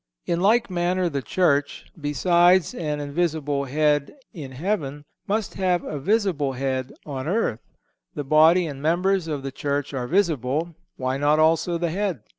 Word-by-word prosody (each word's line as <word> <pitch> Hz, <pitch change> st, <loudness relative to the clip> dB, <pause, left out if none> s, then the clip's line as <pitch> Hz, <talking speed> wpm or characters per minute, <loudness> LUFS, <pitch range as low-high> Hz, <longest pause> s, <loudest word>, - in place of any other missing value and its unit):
In 170 Hz, -, 0 dB
like 220 Hz, +3 st, +3 dB
manner 180 Hz, 0 st, 0 dB
the 140 Hz, -3 st, -3 dB
Church, 145 Hz, 0 st, 0 dB, 0.2 s
besides 175 Hz, +3 st, +3 dB
an 150 Hz, -3 st, -3 dB
invisible 145 Hz, -2 st, -1 dB
Head 145 Hz, -, +1 dB, 0.2 s
in 145 Hz, -7 st, -8 dB
heaven, 145 Hz, -1 st, -3 dB, 0.2 s
must 210 Hz, +1 st, -1 dB
have 180 Hz, -2 st, 0 dB
a 150 Hz, -, -5 dB
visible 175 Hz, -6 st, 0 dB
head 130 Hz, 0 st, -2 dB
on 135 Hz, -2 st, -5 dB
earth. 175 Hz, -, 0 dB, 0.6 s
The 145 Hz, -, -3 dB
body 160 Hz, +5 st, +5 dB
and 140 Hz, -3 st, -6 dB
members 180 Hz, +3 st, +1 dB
of 145 Hz, -4 st, -3 dB
the 135 Hz, -, -4 dB
Church 145 Hz, +1 st, -3 dB
are 125 Hz, -2 st, -3 dB
visible; 160 Hz, -, 0 dB, 0.2 s
why 130 Hz, 0 st, -1 dB
not 145 Hz, +2 st, +3 dB
also 165 Hz, +2 st, +2 dB
the 170 Hz, -1 st, -1 dB
Head? 190 Hz, -, -2 dB
155 Hz, 155 wpm, -24 LUFS, 140-180 Hz, 0.6 s, body